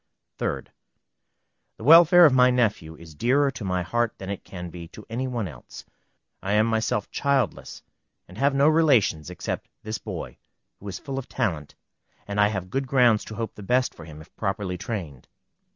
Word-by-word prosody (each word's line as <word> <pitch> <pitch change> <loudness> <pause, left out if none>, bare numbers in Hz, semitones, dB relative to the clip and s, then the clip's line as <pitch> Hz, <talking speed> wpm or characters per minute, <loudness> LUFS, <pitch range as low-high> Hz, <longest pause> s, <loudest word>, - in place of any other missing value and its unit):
3d. - - -2 1.1
The - - -11
welfare 170 +4 +8
of 145 - +5
my 125 -1 +6
nephew 105 -10 0
is 80 -1 -13
dearer 135 - +2
to 120 - -8
my 90 -2 -1
heart 120 +5 -1
than 95 0 -6
it 100 - -6
can 90 -2 -8
be 85 -1 -9
to 105 +5 -13
any 130 +3 -2
one 120 -5 -3
else. 65 -7 -12 0.6
I 95 +3 -2
am 105 +1 +4
myself 110 -2 -1
childless, 140 -6 -1 0.4
and 90 - -14
have 140 0 +2
no 140 +2 +4
relations 135 - +3
except 90 - -5
this 110 -1 -4
boy, - - -7 0.4
who 100 - -11
is 95 - -5
full 135 -1 -5
of 130 - -9
talent, 80 - -2 0.5
and 100 0 0
I 105 - +5
have 95 -3 -4
good 135 0 -2
grounds 125 -5 +4
to 110 - -8
hope 115 +1 -4
the - - -12
best 125 +5 +1
for 85 - -12
him, 75 -1 -11
if 80 - -18
properly 95 -2 -2
trained. 85 - -6
110 Hz, 185 wpm, -25 LUFS, 90-130 Hz, 1.1 s, welfare